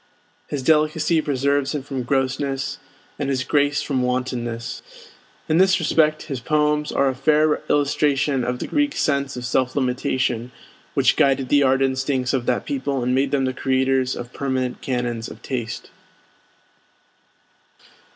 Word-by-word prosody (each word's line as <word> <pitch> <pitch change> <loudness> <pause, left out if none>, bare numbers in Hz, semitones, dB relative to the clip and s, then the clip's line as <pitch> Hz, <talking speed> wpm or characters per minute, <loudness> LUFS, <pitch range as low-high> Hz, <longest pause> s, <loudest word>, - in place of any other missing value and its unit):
His 140 -3 -4
delicacy 155 +2 +2
preserves 140 0 0
him 145 - -3
from 135 -2 -4
grossness, 135 +1 -1 0.4
and 140 -2 -1
his 130 -1 0
grace 145 0 +1
from 135 -3 -1
wantonness. 125 -2 -3 0.7
In 160 +2 +2
this 190 0 +4
respect 155 -1 +2
his 135 -5 -5
poems 150 +2 +1
are 140 - +2
a 135 - +1
fair 150 +3 +2
illustration 145 -1 +1
of 125 +1 -2
the - - -4
Greek 290 -1 0
sense 140 -2 0
of 125 - -5
self 125 +1 0
limitation, 125 -2 -1 0.4
which - - +4
guided 135 -2 +2
the 145 - +4
art 135 0 +3
instincts 130 -1 0
of 125 -3 -1
that - - 0
people 140 - -2
and 125 +1 +1
made 135 +1 +2
them 135 -1 +1
the 130 - -1
creators 130 0 +1
of 120 0 -8
permanent 130 -2 -2
canons 120 -3 -2
of - - -12
taste. 120 -4 -5
135 Hz, 150 wpm, -22 LUFS, 130-145 Hz, 0.7 s, this